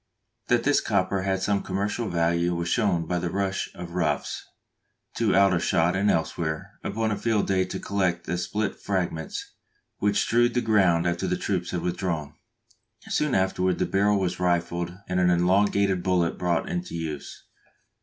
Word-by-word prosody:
[That 120 -1 +2
this 145 0 +3
copper 95 -2 0
had 95 0 -1
some 100 -1 +1
commercial 100 +4 -2
value 85 0 +1
was 85 0 -2
shown 95 -8 +1
by 90 +1 -1
the 85 0 -2
rush 95 +1 -1
of 85 -1 -7
"roughs" 80 -5 -1 0.7
to - - +2
Aldershot 90 -2 +3
and 100 +2 +2
elsewhere 80 -1 -2
upon 110 0 -1
a - - +1
field 110 -1 +1
day 95 -1 +1
to 90 - -5
collect 95 -3 -1
the 90 +1 -2
split 105 +4 -2
fragments 90 -5 -3 0.5
which 100 0 +2
strewed 120 +1 +2
the 125 - +2
ground 95 -7 +3
after 85 0 0
the - - 0
troops 90 -3 -2
had 90 - -2
withdrawn.] 85 -4 -2 0.8
Soon 150 -3 +1
afterward 95 -1 +1
the - - +1
barrel 100 +1 +2
was 90 -2 -2
rifled 85 -1 0 0.2
and 90 0 0
an 90 -1 +4
elongated 95 +2 +2
bullet 90 -2 +1
brought 85 -2 0
into 180 0 -4
use. 80 -3 -6
90 Hz, 165 wpm, -26 LUFS, 85-100 Hz, 0.8 s, an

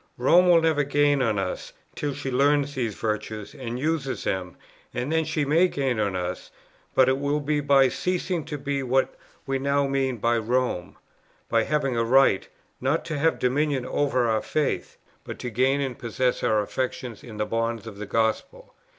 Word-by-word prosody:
Rome 175 +8 +5
will 170 -2 +6
never 155 -3 +3
gain 145 0 +2
on 110 -5 +1
us, 95 - -4 0.2
till 145 -2 -3
she 135 -2 -4
learns 145 +2 +2
these 115 -6 -2
virtues, 110 0 -4
and 125 -4 -5
uses 145 -1 -2
them; 90 -2 -3 0.4
and 125 +5 -2
then 160 0 +2
she 155 -1 -1
may 165 +6 +4
gain 135 -8 -1
us, 90 -3 -2 0.5
but 130 - +5
it 130 +1 +2
will 145 +1 0
be 150 +1 0
by 140 -2 +5
ceasing 180 +2 -2
to 150 - -5
be 140 0 -2
what 130 0 +1 0.3
we 135 -1 -1
now 140 +1 +1
mean 135 -2 0
by 115 +2 +1
Rome, 120 -5 -1 0.5
by 115 -1 +2
having 140 -4 0
a 115 - +2
right, 125 -4 +4 0.3
not 135 +5 0
to 155 -3 -3
'have 165 +3 +2
dominion 135 +1 0
over 130 -3 +1
our 110 -1 +1
faith,' 150 -2 -2 0.3
but - - -7
to 125 - -5
gain 130 +5 +2
and 130 -3 -3
possess 125 +2 -1
our 110 -1 +2
affections 130 0 -4
in 110 -3 -10
the 105 - 0
bonds 115 0 -2
of 105 -3 -9
the 105 - -5
gospel. 115 - -1
135 Hz, 185 wpm, -25 LUFS, 115-145 Hz, 0.5 s, will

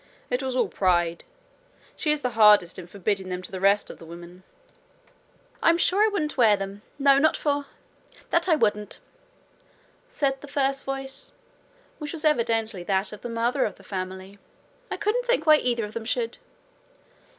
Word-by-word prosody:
It 250 - 0
was 260 -1 -3
all 245 -4 +2
pride. 175 -2 0 0.7
She 300 - 0
is 300 -1 0
the 250 - 0
hardest 210 -6 +5
in 175 - -9
forbidding 195 0 -2
them 180 0 -4
to - - -8
the 190 - -5
rest 200 +2 +2
of - - -14
the - - -12
women.' 170 +2 -11 1.2
'I'm 335 0 +4
sure 370 +3 +2
I - - +5
wouldn't 320 -10 -2
wear 220 -5 +5
them 195 +1 -6 0.2
no, 275 -1 +5
not 315 +2 +3
for 285 -1 -1 0.6
that 340 +2 +2
I 325 - +6
wouldn't!' 210 -6 -1 1.1
said 275 - -1
the 290 - -10
first 275 -1 0
voice, 270 0 -5 0.7
which 300 -2 -5
was 320 -1 -2
evidently 225 -8 +1
that 195 +1 0
of 210 - -10
the 240 - -6
mother 235 +4 0
of 205 - -2
the 195 - -18
family. 190 +1 -6 0.5
'I - - -3
can't 455 +4 0
think - - +1
why 310 -1 +7
either 240 -5 -1
of 210 - -10
them 230 -1 -5
should.' 460 - -2
230 Hz, 175 wpm, -25 LUFS, 195-290 Hz, 1.2 s, why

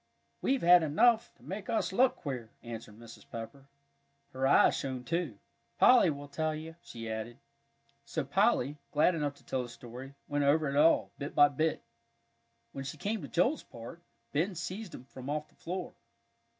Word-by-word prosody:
"We've 270 0 +1
had 175 +1 +8
enough 220 +10 +3
to - - -24
make 195 +2 -6
us 220 -4 0
look 250 +5 +4
queer," 125 -7 -5
answered 115 -3 -8
Mrs. 115 0 -12
Pepper. 115 +4 -8 0.7
Her 130 +1 +1
eyes - - +6
shone 130 -2 -4
too! 165 - -2 0.4
"Polly 245 -8 +7
will 145 -1 -5
tell 155 +2 -1
you," 160 +1 -8
she 115 -1 -8
added. 110 +2 -5 0.7
So - - -3
Polly, 145 +4 +2
glad 155 +4 +4
enough 145 -3 -2
to - - -22
tell 130 - -1
the 120 - -6
story, 125 +3 -10
went 145 0 0
over 150 +2 +3
it 140 - -2
all, 155 +3 +4
bit 140 0 -5
by 145 0 +7
bit. 155 +3 -1 0.9
When 135 - -6
she 140 - -6
came 210 +6 -2
to - - -6
Joel's 245 - +2
part, 120 +9 -11 0.3
Ben 175 +6 0
seized 180 +3 -5
him - - -10
from 130 +1 -9
off 150 +1 -2
the - - -27
floor. 185 +2 -5
145 Hz, 175 wpm, -31 LUFS, 130-170 Hz, 0.9 s, had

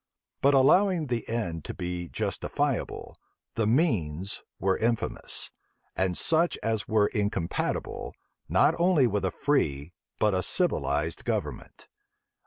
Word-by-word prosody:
But 140 +1 +5
allowing 175 +5 +4
the 120 -4 -3
end 85 -9 -2
to - - -6
be 90 -1 -4
justifiable, - - -2 0.4
the 110 -2 0
means 100 - 0 0.2
were 95 +1 +2
infamous; 115 -1 -1 0.4
and 95 -2 0
such 165 +2 +2
as 110 -2 -1
were 110 -1 +3
incompatible, 100 -6 -2 0.3
not - - +4
only 170 -6 +4
with 105 -4 0
a - - +2
free, 80 - 0 0.2
but 105 -1 +2
a 95 - +1
civilized 75 -2 0
government. - - -4
105 Hz, 120 wpm, -28 LUFS, 90-135 Hz, 0.4 s, But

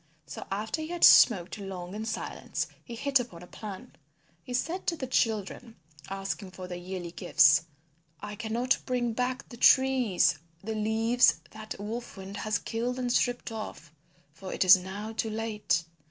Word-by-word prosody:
So - - -8
after 215 +10 -2
he 310 - -4
had 345 0 -4
smoked 190 -3 +6
long 185 -2 -7
in 215 +1 -4
silence 220 - -3 0.2
he 235 - -8
hit 275 +3 +2
upon 180 -9 -7
a - - -10
plan. 200 +2 -8
And - - -27 0.4
he 250 - -11
said 330 +9 -2
to 335 - +1
the 275 - -4
children 225 -1 -1 0.3
asking 195 0 -4
for 185 0 -9
their 180 - -6
yearly 180 -1 -6
gifts, 175 -2 +4 0.5
"I 210 +3 -7
cannot 235 +3 0
bring 245 -2 0
back 250 +2 -2
to - - -31
the 240 - -10
trees 260 -7 +4 0.2
the 220 +2 -3
leaves 220 -4 +3
that 215 0 -8
Wolf 220 +2 -6
Wind 195 +1 -8
has 215 -1 0
killed 235 +4 -3
and 245 -1 -1
stripped 245 -1 0
off, 215 -8 -7 0.4
for 185 +3 -8
it - - 0
is 185 +1 +10
now 195 +4 -6
too 225 0 -2
late. 215 -6 -1
220 Hz, 175 wpm, -29 LUFS, 190-245 Hz, 0.5 s, is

